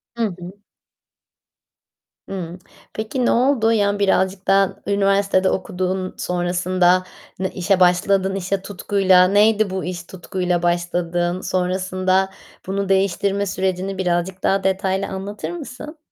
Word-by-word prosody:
Hı 235 - -1 0.2
hı. 185 +3 -10 1.7
Hımm, 180 -2 -6 0.3
peki 220 +4 -2
noldu? 240 -2 +3
Ya 205 -2 +1
birazcık 190 -1 +1
daha 195 0 +3
üniversitede 195 -1 +2
okuduğun 185 0 -2
sonrasında 180 +1 +1 0.4
ne 190 0 -1
işe 190 +1 0
başladın, 190 +2 +3
işe 195 +1 -2
tutkuyla. 190 -1 +3
Neydi 210 +1 +3
bu 190 -1 -3
iş 180 -1 -5
tutkuyla 180 -1 -3
başladığın? 175 0 -1
Sonrasında 185 +1 0 0.4
bunu 195 0 -2
değiştirme 195 +1 +1
sürecini 190 0 -2
birazcık 180 0 -1
daha 195 0 +2
detaylı 190 0 0
anlatır 195 +2 -5
mısın? 300 -1 -8
190 Hz, 110 wpm, -21 LUFS, 180-200 Hz, 1.7 s, noldu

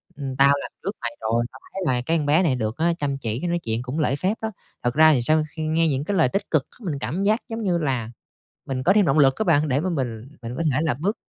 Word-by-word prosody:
ưm, 135 -2 -5
tao 140 +1 +6
làm - - -7
trước 195 - -1
mày 120 - -2
rồi 115 +2 +1
tao 130 - -13
thấy 195 - -4
là 125 -5 +1
cái 165 +3 +2
con 150 - -1
bé 155 +6 +4
này 140 -7 +2
được 110 -2 -3
á 170 +1 +2
chăm 140 -2 -1
chỉ, 115 -2 -3
cái 175 - -2
nói 175 0 0
chuyện 115 -4 -2
cũng 130 +5 -4
lễ 140 -3 +1
phép 190 +8 -1
đó." 220 0 -2 0.3
Thật 120 0 +1
ra 155 +1 +6
thì 130 - +2
sau 155 +5 +2
khi 160 - -3
nghe 160 +1 +2
những 140 -1 0
cái 195 +3 -1
lời 155 -6 +4
tích 195 - -3
cực 155 -4 +2
c - - -24
mình 160 -8 -3
cảm 185 +7 -2
giác 215 +3 +3
giống 225 0 -4
như 180 -4 +1
là 130 -8 -1 0.6
mình 130 -1 -3
có 180 +8 +4
thêm 205 -4 +4
động 140 +3 +2
lực 135 -2 +5
á 220 - 0
bạn 155 -4 +3
để 135 +2 +1
mà 185 +3 -1
mình 125 -5 -3
mình 115 +1 -5
có - - -1
thể 135 - +1
là 160 -6 +1
bước 190 - -2
150 Hz, 305 wpm, -23 LUFS, 130-170 Hz, 0.6 s, tao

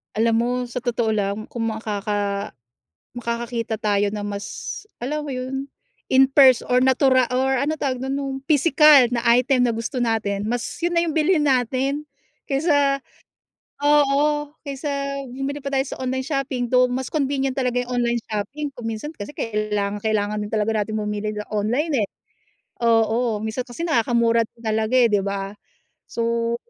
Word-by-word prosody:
Alam 230 +1 +2
mo, 240 +1 +1 0.2
sa 250 +1 -3
totoo 235 -2 0
lang, 205 0 -2
kung 225 -1 -2
makaka 205 -2 -2 0.6
makakakita 235 -1 -3
tayo 205 -1 +1
na 210 -1 -4
mas, 205 - -5 0.2
alam 300 +3 -3
mo 280 - -4
yun, 265 +2 -4 0.4
in 265 0 +5
pers 265 -3 +6
or, 250 0 +2
natura 260 -1 +4
or, 260 +1 +1
ano 295 +3 0
tawag 265 -4 -2
dun? 265 +1 -2
Nung 275 -1 -3
pisikal 295 -4 +6
na 245 - +1 0.2
item 250 0 +3
na 230 - 0
gusto 235 +3 -3
natin, 215 -3 -1
mas 240 0 -1 0.2
yun 345 0 -1
na 335 - +3
yung 330 - -1
bilhin 315 0 +3
natin, 270 +2 0 0.4
kaysa 280 -1 +2 0.8
oo, 295 0 +3 0.2
kaysa 280 0 -3
bumili 270 +3 -4
pa 275 - -7
tayo 270 0 0
sa - - -7
online 260 +1 -1
shopping, 275 -4 -2
though 250 0 +5
mas 255 +1 -3
convenient 275 -3 0
talaga 250 -2 0
yung 245 0 -2
online 235 -1 0
shopping 270 +8 -4
kung 235 -2 -7
minsan, 225 +7 -5
kasi, 205 -6 -8
kailangang-kailangan 210 -1 -1
din 210 - -5
talaga 220 0 0
natin 215 +1 -3
bumili 210 0 -2
sa 210 - -4
online, 245 +10 0
eh. 200 - -2 0.7
Oo, 225 0 +2
minsan 220 +3 -3
kasi 245 +6 -8
nakakamura 235 -4 +2
din 230 - -24
talaga, 220 +1 -1
eh, 250 -2 +6
'di 200 -2 +1
ba? 195 0 -3 0.6
So 230 0 -1
245 Hz, 160 wpm, -22 LUFS, 220-275 Hz, 0.8 s, pers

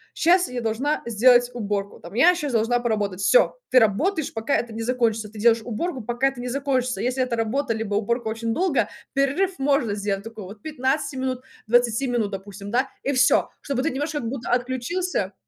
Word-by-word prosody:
щас 355 0 +3
я 250 -1 -4
должна 245 +7 -1
сделать 245 +2 +4
уборку, 205 -3 -3
там 175 +4 -11
я 330 +9 +6
щас 295 -6 -3
должна 230 +2 +2
поработать. 210 -5 -1
Всё, - - +4
ты 255 - +3
работаешь 285 - +1
пока 225 +5 0
это 235 -2 -4
не 225 - -5
закончится. 225 -3 0
Ты 215 - -11
делаешь 230 +1 +4
уборку 255 +5 -3
пока 240 +4 0
это 255 -3 -9
не 250 - -4
закончится. 260 -2 -1
Если 255 +2 0
это 245 -2 -2
работа, 230 +3 0
либо 220 -2 -3
уборка 235 +3 -1
очень 225 +1 -2
долго, 360 -5 +1 0.2
перерыв 285 +8 +1
можно 270 -6 +1
сделать 200 -1 -2
такой 225 -3 -9
вот 205 +3 -11
15 290 -1 -1
минут, 260 -1 -2 0.3
20 240 +2 +2
минут 230 -4 0
допустим, 200 +1 -7
да, 255 +3 +1
и 280 - 0
всё, 255 +1 +4
чтобы 270 -2 -2
ты 320 - 0
немножко 295 +3 -3
как 235 - -4
будто 255 -2 -5
отключился. 255 - -1
245 Hz, 195 wpm, -24 LUFS, 220-275 Hz, 0.3 s, я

